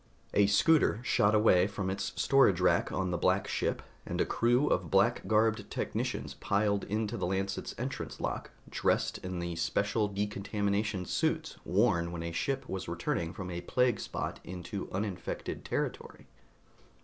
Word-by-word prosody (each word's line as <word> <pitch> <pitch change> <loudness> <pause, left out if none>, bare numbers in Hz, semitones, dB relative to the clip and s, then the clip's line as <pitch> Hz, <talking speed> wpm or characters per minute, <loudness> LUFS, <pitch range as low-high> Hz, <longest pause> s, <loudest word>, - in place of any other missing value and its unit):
A 100 -1 +5
scooter 115 +3 +4
shot 105 -3 +3
away 100 -4 +5
from 100 -2 -3
its 95 - -3
storage 135 -10 +4
rack 90 - +3
on 95 -1 -1
the 85 - -1
black - - +2
ship, - - -1 0.2
and - - -4
a - - +3
crew 120 +4 +2
of 90 - +1
black - - +3
garbed 110 -1 +2
technicians - - -3
piled 100 0 0
into 110 +2 -2
the 90 - -1
Lancet's 95 +1 -2
entrance 130 +3 -5
lock, - - -3 0.2
dressed - - 0
in 95 -1 -5
the 85 -1 -3
special 100 +5 +1
decontamination 100 0 -1
suits - - -1
worn 85 0 +2
when 85 -1 -5
a 85 - -3
ship 135 +10 -2
was 95 -1 -4
returning 85 -1 -2
from 90 0 -6
a 85 0 -4
plague 125 +4 +1
spot - - -4
into 95 +3 -6
uninfected 95 -1 -4
territory. - - -4
100 Hz, 155 wpm, -31 LUFS, 90-105 Hz, 0.2 s, A